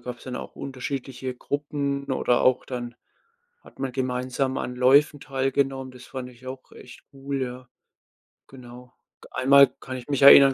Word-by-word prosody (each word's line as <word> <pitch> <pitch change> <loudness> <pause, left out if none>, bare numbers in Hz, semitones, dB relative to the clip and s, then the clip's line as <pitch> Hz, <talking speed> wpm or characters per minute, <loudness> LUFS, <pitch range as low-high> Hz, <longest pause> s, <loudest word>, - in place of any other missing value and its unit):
gab's 120 0 -8
dann 125 -1 -5
auch - - -8
unterschiedliche 130 -1 -5
Gruppen, 140 0 -3
oder 125 -1 +2
auch 130 0 +3
dann 120 -2 -5 0.7
hat - - -18
man 135 -1 -2
gemeinsam 130 +1 -1
an 125 0 -4
Läufen 140 +4 +4
teilgenommen, 135 -1 -1
das 125 - -13
fand 130 -2 -6
ich 125 +1 -17
auch 130 0 -8
echt 125 - -13
cool, 135 0 -4
ja. 125 0 -6 0.8
Genau. 125 -1 -13 0.3
G - - -14
einmal 140 +2 +6
kann 130 - -6
ich 125 - -10
mich 140 -1 0
erinnern, 140 -1 +10
130 Hz, 160 wpm, -25 LUFS, 125-135 Hz, 0.8 s, erinnern